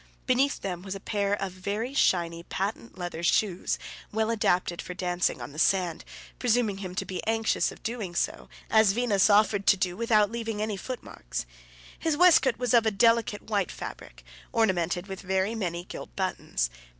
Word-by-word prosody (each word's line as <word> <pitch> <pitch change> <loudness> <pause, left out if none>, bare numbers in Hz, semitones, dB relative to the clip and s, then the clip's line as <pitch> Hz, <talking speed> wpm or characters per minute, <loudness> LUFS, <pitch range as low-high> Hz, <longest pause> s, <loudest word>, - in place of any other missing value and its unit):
Beneath 270 +2 +2
them 180 -3 -4
there - - -14
was 195 0 -4
a - - -6
pair 200 0 0
of 195 -1 -3
very 205 +7 -3
shiny 170 -9 +2
patent 200 +5 -4
leather 175 -2 -5
shoes, 180 +1 +1 0.3
well 220 +1 0
adapted 180 -5 +1
for 180 - -7
dancing 180 -5 0
on 120 +3 -7
the 150 - -8
sand, 180 -3 +2 0.4
presuming 230 -5 +1
him 185 -2 -6
to - - -2
be 185 - -5
anxious 225 0 +1
of - - -14
doing 220 -7 -4
so, - - -2 0.2
as 220 -3 +5
Venus 215 -4 +3
offered 205 -1 +3
to 195 - +6
do, 180 -1 -1
without 215 -1 +3
leaving 225 -2 -3
any 215 -1 -1
footmarks. 195 - -6 0.5
His 320 -2 0
waistcoat 300 -8 +5
was 245 -1 0
of 230 -2 +5
a - - +6
delicate 225 0 +2
white 205 -4 -1
fabric, - - -9 0.3
ornamented 180 -6 +1
with 190 -2 -7
very 190 +3 0
many 175 -6 -3
gilt - - -9
buttons. - - -1
200 Hz, 175 wpm, -27 LUFS, 180-225 Hz, 0.5 s, to